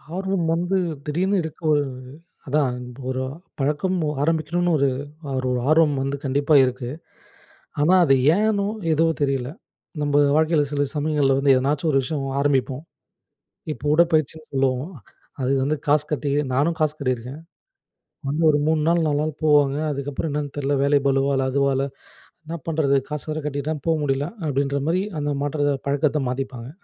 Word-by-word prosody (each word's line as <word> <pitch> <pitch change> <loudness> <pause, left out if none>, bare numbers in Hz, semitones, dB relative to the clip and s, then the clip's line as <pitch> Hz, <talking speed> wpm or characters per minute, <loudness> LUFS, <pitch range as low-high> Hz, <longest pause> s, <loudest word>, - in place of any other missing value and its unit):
ஆர்வம் 190 -2 -1
வந்து 175 +3 0 0.3
திடீர்னு 185 +7 0
இருக்கு, 160 +1 -8
ஒரு 145 -1 +3 0.6
அதான் 140 -3 +1 0.3
ஒரு 130 0 -2 0.4
பழக்கம் 150 +7 0 0.3
ஆரம்பிக்கணும்னு 170 +3 0
ஒரு 140 0 +3 0.5
ஒரு 130 - -1
ஒரு 125 - 0
ஆர்வம் 155 -2 +4
வந்து 135 +1 -2
கண்டிப்பா 140 +3 +2
இருக்கு. 125 -1 -4 0.9
ஆனா 170 +5 +4
அது 135 -3 +5 0.2
ஏன்னோ 205 -1 +1 0.3
எதுவோ 165 +1 +3
தெரியல. 135 -2 0 0.5
நம்ம 145 -1 +1 0.2
வாழ்க்கையில 155 -1 +3
சில 145 0 +1
சமயங்கள்ல 145 -3 +2
வந்து 140 -1 +4
எதனாச்சும் 145 +5 0
ஒரு 135 - +3
விஷயம் 140 -1 -3
ஆரம்பிப்போம். 135 -1 0 0.9
இப்போ 150 - -11
உடற்பயிற்சின்னு 160 -2 +1
சொல்லுவோம். 135 +2 0 0.5
அதுக்கு 135 +1 +1
வந்து 155 +1 0
காசு 150 +1 +3
கட்டி 145 -1 -1 0.2
நானும் 155 +5 +1
காசு 155 -1 +1
கட்டியிருக்கேன். 130 +2 -3 0.9
வந்து 155 +4 0
ஒரு 145 - +4
3 155 -1 +2
நாள், 170 0 +3
4 145 -1 +1
நாள் 155 -1 -3
போவாங்க, 145 -2 +4
அதுக்கப்புறம் 140 +2 -3
என்னன்னு 145 -1 -3
தெரியல, 145 0 0
வேலை 140 +1 +4
பளுவா 135 +1 +2
இல்ல 135 - +1
அதுவ 140 +1 +2
இல்ல 135 +1 0 0.6
என்ன 165 - -5
பண்ணுறது? 150 -4 +2
காசு 150 +1 -5
வேற 155 +1 -2
கட்டிட்டேன் 145 +1 -3
போ 165 - +3
முடியல! 140 +1 0 0.2
அப்படின்ற 140 0 0
மாரி 180 +3 +1 0.2
அந்த 145 0 -1
மாற்றத்தை 145 0 0
பழக்கத்த 145 +1 +1
மாத்திப்பாங்க. 130 -2 -5
145 Hz, 150 wpm, -23 LUFS, 135-155 Hz, 0.9 s, அது